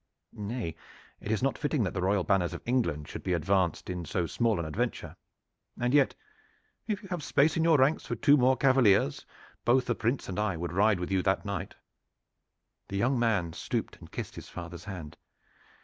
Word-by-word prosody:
"Nay, 105 -5 -4 0.4
it 105 - -4
is 110 +2 0
not 135 - 0
fitting 145 -5 0
that 95 - -2
the 95 - -2
royal 95 0 +2
banners 90 -2 +1
of - - -9
England 85 - 0
should - - -7
be 90 - -1
advanced 90 +1 +1
in 90 -1 -4
so 85 +1 -1
small 115 +4 +1
an 85 - -2
adventure. 75 -1 -3 0.6
And 120 +1 0
yet, 145 -2 +4 0.7
if 210 -2 -2
you 195 - -11
have 175 -3 -3
space 150 +2 +2
in 160 - +1
your 165 -2 +5
ranks 135 +4 +2
for - - -2
two 145 - +5
more 130 -1 +4
cavaliers, 120 - +3 0.4
both 125 +2 +3
the 120 - +1
Prince 115 +5 -1
and 95 +1 -3
I 100 -5 0
would 85 0 -4
ride 100 +1 +3
with 90 +2 -4
you 95 -1 +2
that 95 +3 0
night." 100 0 -4 1.1
The 100 - -4
young 125 +5 +2
man 100 -8 +1
stooped - - -3
and - - -14
kissed - - -5
his - - -10
father's 85 +1 -8
hand. 90 -7 -7
105 Hz, 195 wpm, -29 LUFS, 90-130 Hz, 1.1 s, your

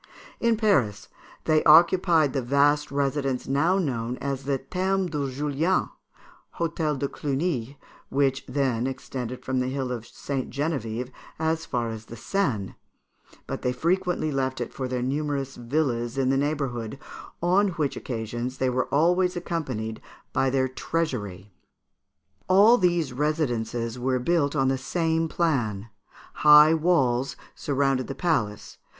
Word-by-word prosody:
In 235 -1 +2
Paris, 130 - +1 0.3
they 155 -1 +3
occupied 165 -2 +5
the 135 - 0
vast 145 +4 +2
residence 140 -2 -1
now 145 +8 +2
known 125 -8 -2
as 135 -1 -4
the 140 -1 +1
Thermes 185 +6 -1
de 145 -3 -2
Julien 150 +6 0 0.7
(Hôtel 160 -3 -1
de 140 +1 -1
Cluny), 140 -3 -2 0.3
which 135 -1 +1
then 130 -3 0
extended 125 -1 -6
from 130 0 0
the 125 - 0
hill 130 -1 -3
of 120 -2 -5
St. 135 +1 -4
Geneviève 125 -4 -3 0.3
as 160 0 -1
far 120 -2 -1
as 110 0 -8
the 115 - -10
Seine; 120 - -1 0.7
but - - -5
they 125 - 0
frequently 170 +3 0
left 130 -2 -1
it 120 - -4
for 130 - -3
their 125 -1 -2
numerous 140 0 -2
villas 120 -1 -1
in 130 -1 +2
the - - +2
neighbourhood, 135 -5 -2 0.4
on 185 +4 +3
which 150 -5 -1
occasions 120 +2 -4
they 130 -1 +1
were 130 +1 0
always 180 +5 +2
accompanied 130 -11 -4 0.3
by 135 0 +2
their 130 0 +1
treasury. 110 - -3 0.9
All 205 +6 +6
these 175 -7 +1
residences 120 -5 -1
were 130 +1 +1
built 145 +2 +1
on 135 -2 +2
the 135 0 +1
same 165 +2 0
plan. 115 - -1 0.5
High 150 +1 +8
walls 135 -7 +2 0.2
surrounded 135 -2 0
the 135 - -5
palace. 120 - -1
135 Hz, 140 wpm, -26 LUFS, 125-160 Hz, 0.9 s, High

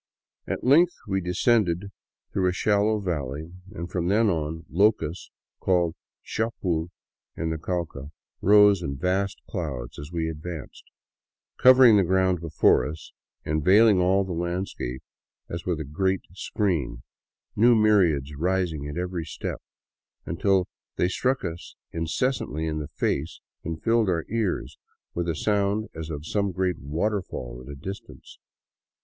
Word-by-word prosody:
At - - -3
length 165 +7 +5
we 95 -1 0
descended 95 0 +1 0.4
through 95 -2 +2
a - - -1
shal 100 +2 +2
low 110 -1 +1
valley, 80 -2 -4 0.2
and 85 -4 -6
from 85 -1 -2
then 105 +2 +3
on, 80 0 -3
locusts 100 -3 +1 0.3
called 90 -3 +2 0.3
chapul 90 -7 -2 0.5
in 80 0 -1
the 80 - -3
Cauca, 80 -5 -4 0.3
rose 105 -1 +6
in 70 -4 -3
vast 95 +5 0
clouds 70 - -5
as 70 +3 -8
we 85 -2 -1
advanced, 80 -1 -7 0.7
covering 125 -4 +8
the 100 - +4
ground 95 -1 +2
before 80 -2 +3
us 80 +1 -7 0.3
and 75 0 0
veiling 105 +2 +6
all 95 +2 +3
the 95 - -6
landscape 85 -7 -3 0.4
as 85 +2 -6
with 85 -4 0
a - - -2
great 95 +6 0
screen, 85 - -2 0.5
new 120 +3 +6
myriads 90 -10 +3
rising 85 -2 -1
at 75 - -6
every 90 -1 -2
step, - - -5 0.6
until 95 +2 +1 0.3
they 90 - +2
struck 130 +7 0
us 85 0 -6 0.2
incessantly 80 - -1
in 75 -1 -2
the 75 - -5
face 75 +3 -2 0.2
and 80 0 -5
filled 115 -3 +3
our 85 -3 0
ears 110 -5 -2 0.3
with 85 0 -2
a 80 - 0
sound 105 +3 0
as 80 0 -6
of 75 -1 -5
some 100 +3 0
great 90 -1 -1
waterfall 75 - -3
at 70 - -9
a - - -7
distance. 95 +8 -9
90 Hz, 145 wpm, -26 LUFS, 80-100 Hz, 0.7 s, covering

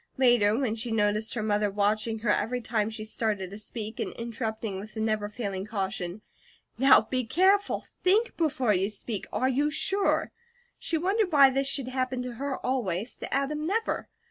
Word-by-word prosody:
Later, 240 -5 +4
when 250 -5 0
she 230 +1 -3
noticed 215 +1 +1
her 220 - -2
mother 210 -1 +1
watching 210 +3 0
her - - +4
every 240 +4 0
time 220 -2 -1
she 220 -1 -6
started 210 -4 -2
to 200 - -7
speak, 215 0 -5
and - - -3
interrupting 225 -3 -4
with 210 +2 -10
the - - -4
never 215 -1 0
failing 200 -4 -4
caution: 195 -2 -4 0.6
"Now 270 -2 +7
be 255 +3 -2
careful! 380 - +2 0.2
THINK 430 +6 +2
before 265 -9 +1
you 190 +1 +1
speak! 210 0 -4
Are 255 - +1
you 280 +3 +1
SURE?" 385 +6 +1 0.5
she 330 - -1
wondered 385 +3 +1
why 280 -3 +7
this 270 +1 +1
should 275 -2 +1
happen 255 -1 -2
to 250 -1 -5
her 280 -1 -2
always, 225 -5 -1
to - - -7
Adam 300 +3 -1
never. 445 +5 -1
230 Hz, 180 wpm, -28 LUFS, 210-270 Hz, 0.6 s, Now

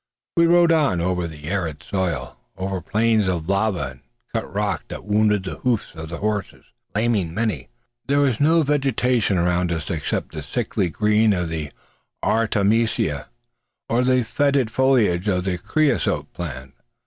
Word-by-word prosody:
We 170 0 +5
rode 170 0 +5
on 150 - +3
over 90 0 0
the 75 -2 -10
arid 85 -5 -2
soil; 85 -10 -2 0.2
over 95 0 -3
plains 110 +2 +2
of 85 -3 -1
lava 100 -1 +1
and 65 - -16 0.3
cut 115 - -3
rock 105 0 -1
that - - -7
wounded 105 -1 +2
the 95 - -6
hoofs 120 -4 -1
of 80 0 -8
our 85 - -4
horses, 105 -1 -3 0.3
laming 105 -7 0
many. 95 - -2 0.4
There 140 +1 +2
was 130 -6 +1
no 160 +3 +4
vegetation 130 -7 +1
around 90 0 +1
us 80 -3 -3
except 80 -4 -2
the 80 - -5
sickly 100 +3 -1
green 105 +4 +3
of 90 -3 -1
the 80 -3 -4 0.5
artemisia, 110 - +1 0.6
or 120 +2 +2
the 130 -1 +3
fetid 140 0 +1
foliage 115 -8 +2
of 90 -3 +1
the 90 -2 -2
creosote 150 - 0
plant. 65 -6 -6
105 Hz, 155 wpm, -22 LUFS, 85-120 Hz, 0.6 s, We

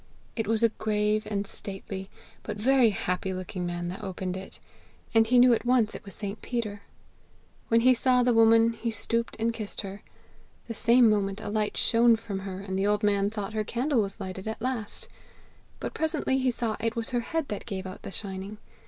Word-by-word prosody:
It 225 -3 -2
was 225 +1 +1
a 230 - +6
grave 215 0 0
and 205 -1 -1
stately, 195 -1 -6 0.3
but - - -5
very 250 +2 +4
happy 185 -1 -2
looking 185 -1 -4
man 175 0 -3
that 195 +4 -7
opened 185 -1 -4
it, 190 0 -8 0.5
and 225 -1 +5
he 250 +2 +4
knew 245 0 +7
at 225 - 0
once 240 -3 +3
it - - -8
was 200 -2 -10
St. 205 0 -5
Peter. 215 -4 -3 0.9
When 230 0 +4
he 255 +2 +6
saw 250 0 +3
the 245 0 +3
woman, 225 0 +5
he 230 +1 -3
stooped 230 +1 -2
and 230 +1 0
kissed 215 -3 -5
her. 200 0 -8 0.7
The 230 - -4
same 235 +2 +5
moment 200 -2 +1
a - - -5
light 210 0 -1
shone 235 0 +5
from 215 -3 -5
her, 190 -1 -6
and 190 -1 -3
the 195 - +2
old 210 +1 +1
man 200 -1 +2
thought 210 -1 -5
her 215 -1 0
candle 245 +3 +1
was 200 +1 -3
lighted 190 0 -6
at 220 - -4
last; 240 -3 -3 0.7
but - - -4
presently 310 -4 0
he 260 -1 +2
saw 235 -3 -1
it 230 +1 -1
was 230 +1 -3
her 245 - +1
head 320 +5 -2
that 205 - -5
gave 190 -1 -4
out 185 0 -8
the - - -7
shining. 195 +1 -4
215 Hz, 205 wpm, -28 LUFS, 195-230 Hz, 0.9 s, knew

